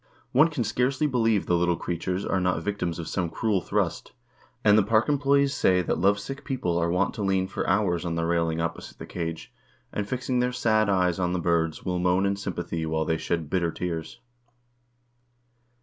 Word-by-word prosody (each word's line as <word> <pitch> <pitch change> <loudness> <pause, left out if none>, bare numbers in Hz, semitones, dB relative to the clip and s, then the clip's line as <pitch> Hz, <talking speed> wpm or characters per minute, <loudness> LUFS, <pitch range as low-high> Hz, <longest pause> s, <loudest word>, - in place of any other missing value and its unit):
One 150 +6 +6
can 150 -7 -2
scarcely 130 +6 0
believe 115 -7 +2
the 90 - +2
little 85 0 +2
creatures 90 +3 -3
are 95 - 0
not 90 0 0
victims 100 -5 -2
of 85 - -5
some 90 -3 -1
cruel 105 0 0
thrust, - - -2 0.5
and 105 -1 +6
the 110 - +6
park 110 +3 +2
employes 140 -1 +2
say 90 -7 +3
that 80 - -1
lovesick 100 +9 0
people 120 - -2
are 85 0 +1
wont 90 +3 +1
to - - -6
lean 95 -1 +1
for 95 - -3
hours 95 -4 +1
on 85 -2 -2
the 85 0 -1
railing 85 -1 0
opposite 85 0 -4
the - - -8
cage, 80 -2 -5 0.4
and, 100 -1 -3
fixing 125 0 -1
their 125 0 +1
sad 110 -3 +2
eyes 90 -2 +2
on 90 -1 0
the 90 - 0
birds, 85 -2 0
will 90 -1 -1
moan 90 +2 +2
in 100 0 +1
sympathy 85 -4 -4
while 80 0 -1
they 80 0 0
shed 85 -3 -2
bitter 85 0 0
tears. 80 -3 -5
95 Hz, 195 wpm, -26 LUFS, 85-110 Hz, 0.5 s, One